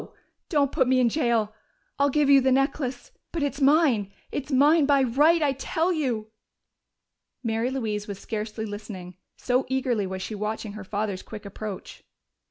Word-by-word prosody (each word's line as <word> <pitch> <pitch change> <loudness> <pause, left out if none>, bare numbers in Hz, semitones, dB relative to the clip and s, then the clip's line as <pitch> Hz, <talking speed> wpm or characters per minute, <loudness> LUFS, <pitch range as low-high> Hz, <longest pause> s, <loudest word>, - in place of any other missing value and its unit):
Don't 285 -5 +2
put 260 - +2
me 260 0 +3
in 245 -2 +4
jail! 230 -6 +1 0.5
I'll 280 0 +4
give 295 +1 +2
you 275 -1 +7
the 260 0 +2
necklace. 270 -1 -1 0.2
But 330 -3 -2
it's 285 0 -2
mine 270 -8 +3 0.2
it's 285 +1 -4
mine 290 +3 +5
by 280 -2 +4
right, 300 +7 +4
I 285 - +3
tell 325 +6 -1
you!" 240 -9 -2 1.1
Mary 225 +1 0
Louise 215 -6 -3
was 200 -2 -5
scarcely 215 +1 -4
listening, 205 -4 -8 0.2
so 250 +1 +1
eagerly 255 -6 0
was 190 0 -5
she 220 - -5
watching 210 0 -4
her 215 -1 -8
father's 200 -1 -3
quick 215 -1 -10
approach. 200 0 -7
245 Hz, 165 wpm, -26 LUFS, 215-280 Hz, 1.1 s, you